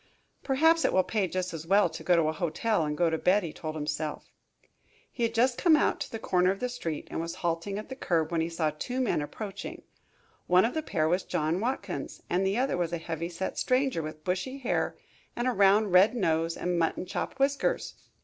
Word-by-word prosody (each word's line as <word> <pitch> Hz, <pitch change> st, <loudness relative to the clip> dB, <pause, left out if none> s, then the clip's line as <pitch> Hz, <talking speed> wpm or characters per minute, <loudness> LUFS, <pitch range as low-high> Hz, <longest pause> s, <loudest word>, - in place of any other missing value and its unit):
"Perhaps 320 Hz, +5 st, +3 dB
it -, -, +2 dB
will 185 Hz, -, +4 dB
pay 205 Hz, -2 st, 0 dB
just 185 Hz, 0 st, -3 dB
as 165 Hz, 0 st, -7 dB
well 200 Hz, +3 st, +5 dB
to -, -, -8 dB
go 180 Hz, -, +4 dB
to 165 Hz, -, +3 dB
a 155 Hz, 0 st, 0 dB
hotel 180 Hz, +3 st, 0 dB
and 150 Hz, 0 st, -2 dB
go 170 Hz, -2 st, +2 dB
to 160 Hz, -, -1 dB
bed," 195 Hz, +3 st, +3 dB
he 165 Hz, -, -5 dB
told 155 Hz, 0 st, -6 dB
himself. 150 Hz, 0 st, -4 dB, 0.8 s
He -, -, -8 dB
had 230 Hz, 0 st, +1 dB
just 245 Hz, +2 st, +2 dB
come 335 Hz, -3 st, +6 dB
out 300 Hz, -, +2 dB
to -, -, -5 dB
the 225 Hz, -, -3 dB
corner 180 Hz, -4 st, +2 dB
of 195 Hz, +1 st, -1 dB
the 250 Hz, -, -1 dB
street 165 Hz, -11 st, -4 dB
and -, -, -2 dB
was 165 Hz, 0 st, -5 dB
halting 170 Hz, +4 st, -1 dB
at 215 Hz, -, -7 dB
the 265 Hz, -, -5 dB
curb, 165 Hz, -, 0 dB
when 165 Hz, -1 st, +1 dB
he 165 Hz, -, -1 dB
saw 165 Hz, -2 st, 0 dB
two 245 Hz, -, -4 dB
men 250 Hz, -11 st, +1 dB
approaching. 195 Hz, +7 st, -6 dB, 0.6 s
One 180 Hz, +3 st, +5 dB
of 235 Hz, -, -1 dB
the 315 Hz, -, -1 dB
pair 160 Hz, -, 0 dB
was 180 Hz, +3 st, +2 dB
John 165 Hz, -1 st, -1 dB
Watkins, 250 Hz, +5 st, -4 dB
and 180 Hz, +2 st, +2 dB
the 195 Hz, +3 st, +1 dB
other 255 Hz, -6 st, +1 dB
was 175 Hz, -2 st, -1 dB
a 170 Hz, -, -1 dB
heavy 165 Hz, 0 st, -4 dB
set 180 Hz, +2 st, -4 dB
stranger, 255 Hz, -7 st, +1 dB
with 155 Hz, 0 st, -7 dB
bushy 185 Hz, -, -2 dB
hair 270 Hz, -, -1 dB, 0.4 s
and 240 Hz, +1 st, -1 dB
a -, -, +3 dB
round, 205 Hz, -1 st, +4 dB
red 190 Hz, +7 st, +6 dB
nose 165 Hz, -5 st, 0 dB
and 180 Hz, -1 st, -1 dB
mutton 165 Hz, +2 st, 0 dB
chop 180 Hz, -, -4 dB
whiskers. 275 Hz, +1 st, 0 dB
185 Hz, 225 wpm, -28 LUFS, 165-230 Hz, 0.8 s, come